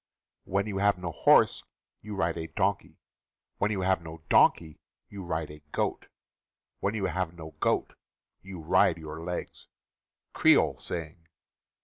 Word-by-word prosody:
(When 100 +1 0
you 100 -2 -3
have 100 -1 +3
no 90 -2 -5
horse, - - +4 0.4
you 105 0 -7
ride 85 -3 0
a 80 -1 -5
donkey; - - -1 0.6
When 105 - +2
you 100 -3 -1
have 95 -1 +1
no 80 -1 -10
donkey, 80 -2 +4 0.3
you 100 -1 -8
ride 80 -3 -3
a 75 - -11
goat; - - -2 0.7
When 100 +2 -1
you 100 -3 -1
have 90 -3 -2
no 80 -1 -9
goat, - - 0 0.5
you 95 -3 -9
ride 85 0 +3
your 80 0 -8
legs.) 90 0 -6 0.3
— - - -60
Creole - - +4
Saying. 80 0 -7
85 Hz, 150 wpm, -28 LUFS, 80-95 Hz, 0.7 s, horse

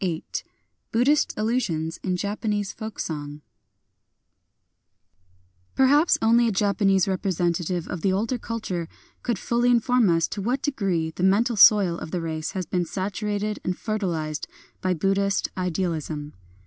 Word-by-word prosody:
VIII 170 -3 -2 0.7
BUDDHIST 280 +6 +2
ALLUSIONS 210 -9 -1
IN 185 -1 -1
JAPANESE 205 +1 -2
FOLK 220 -1 -7
SONG 150 -2 -5 2.3
Peehaps 290 +5 +4
only 235 +1 +5
a - - +1
Japanese 200 -1 +2
representative 175 -2 -1
of 175 - -5
the 190 - +2
older 225 +6 -1
culture 205 -8 -4 0.3
could 235 -4 -1
fully 240 +5 +1
inform 245 -2 +3
us 165 -1 +2
to 205 - -5
what 250 +6 -1
degree 195 - -1
the 170 - -8
mental 215 +6 +3
soil 195 -4 +6
of - - -7
the 180 - -2
race 160 0 -4
has 185 -3 -3
been 180 +2 -1
saturated 205 +3 -3
and 180 0 -2
fertilized 170 -9 -2 0.3
by 185 -1 +1
Buddhist 195 +3 0
idealism. 165 -5 -3
195 Hz, 135 wpm, -25 LUFS, 170-220 Hz, 2.3 s, soil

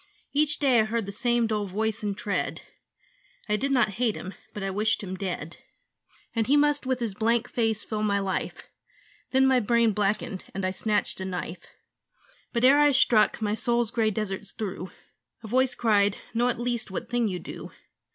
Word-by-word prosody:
Each 300 +1 +2
day 265 -5 +4
I 215 - +4
heard 225 0 -1
the 200 - -5
same 240 +2 +1
dull 210 -2 -1
voice 215 +3 -1
and 205 -2 -2
tread; 205 - -2 0.8
I 210 - +2
did 275 +6 -1
not 245 -5 +3
hate 235 -4 +2
him: 190 - -7 0.2
but 205 - -6
I 195 - -1
wished 210 +2 0
him 190 -1 -5
dead. 175 -4 -5 0.8
And 225 -1 +1
he 285 +3 +5
must 290 -2 +2
with 260 -1 0
his 230 -4 -2
blank 230 +3 +1
face 225 -3 0
fill 215 -1 -3
my 205 -1 +2
life 195 -1 -3 0.7
Then 265 0 +4
my 260 -1 +4
brain 235 0 +3
blackened; 205 0 -1
and 195 -1 -2
I 185 - 0
snatched 210 0 -1
a - - -3
knife. 180 -2 -5 0.8
But 235 -1 -1
ere 280 +3 +7
I 295 0 +6
struck, 225 -4 +4
my 210 0 +1
soul's 235 0 +1
grey 225 -3 +2
deserts 205 -1 -4
through 190 -4 -5 0.5
A - - -7
voice 255 +3 +2
cried, 205 -3 +3 0.2
'Know 240 +2 +2
at 235 - -2
least 240 -2 -2
what 210 +5 -5
thing 240 -2 +1
you 185 -3 -2
do.' - - -8
220 Hz, 190 wpm, -27 LUFS, 200-240 Hz, 0.8 s, ere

